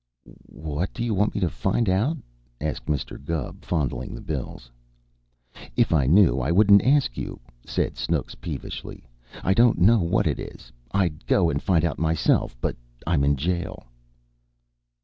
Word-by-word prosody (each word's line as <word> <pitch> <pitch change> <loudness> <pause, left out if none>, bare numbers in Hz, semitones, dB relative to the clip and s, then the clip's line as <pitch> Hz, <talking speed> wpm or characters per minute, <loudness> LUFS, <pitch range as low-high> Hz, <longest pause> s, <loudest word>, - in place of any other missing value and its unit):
"What 80 +3 -4
do 120 - -3
you 120 -2 0
want 105 +2 +1
me 105 - -1
to 90 - +3
find 115 - 0
out?" 110 - +1 0.4
asked 75 -1 -4
Mr. 70 -2 -3
Gubb, 80 -2 -4
fondling 65 -8 -2
the - - -8
bills. - - -6 1.0
"If - - +2
I 70 -5 +3
knew, 80 -5 +5
I 65 +5 0
wouldn't 100 +2 +6
ask 140 - +2
you," - - -6 0.3
said - - -1
Snooks - - -1
peevishly. - - -7 0.4
"I 95 - +3
don't 115 +3 +4
know 110 +7 +5
what 85 -2 +1
it - - 0
is. - - -9 0.2
I'd 85 -4 -1
go 85 -4 +3
and 70 - -2
find 85 -3 +2
out 80 -5 -2
myself, 80 -5 +1
but - - -1 0.3
I'm 80 -4 +2
in 70 +1 +3
jail." 85 +5 -3
85 Hz, 160 wpm, -24 LUFS, 70-100 Hz, 1.0 s, wouldn't